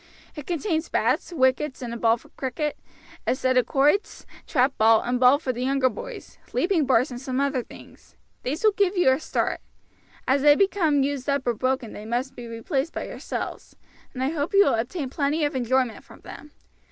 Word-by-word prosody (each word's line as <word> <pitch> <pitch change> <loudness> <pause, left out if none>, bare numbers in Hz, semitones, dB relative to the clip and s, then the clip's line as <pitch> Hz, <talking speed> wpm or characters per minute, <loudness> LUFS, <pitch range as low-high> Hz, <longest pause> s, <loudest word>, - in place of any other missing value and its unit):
It 295 -3 -8
contains 335 -1 -1
bats, - - 0
wickets, 260 -1 +1
and 235 -1 -5
a - - -4
ball 230 0 +3
for - - -19
cricket; 280 +3 -3 0.5
a - - +2
set 260 0 0
of 250 -2 +3
quoits; 295 +9 +1 0.2
trap 265 -1 +2
bat 220 0 +5
and 245 +1 0
ball 255 +2 +6
for 275 -4 -3
the 245 +1 -4
younger 265 0 +2
boys; - - -9
leaping 340 -6 +1
bars 255 +1 +3
and 245 0 -7
some 260 -1 -2
other 275 -2 0
things. - - -16 0.3
These 295 - -3
will 430 - +6
give 395 -1 +1
you 355 -7 +5
a 260 - +1
start. - - -1 0.7
As 265 +1 +3
they 290 0 +7
become 325 -7 +2
used 280 -1 -2
up 280 -1 0
or 240 - +1
broken 255 0 -2
they 210 - -9
must 245 +4 -2
be 240 -1 -8
replaced 265 +7 -3
by - - -4
yourselves; - - -6 0.4
and 255 - -2
I 265 - +1
hope 320 +5 -2
you 400 - +7
will 275 - +2
obtain 255 +5 -3
plenty 295 +2 0
of 290 - -2
enjoyment 255 -1 0
from - - -16
them. 300 - -11
270 Hz, 200 wpm, -24 LUFS, 250-300 Hz, 0.7 s, they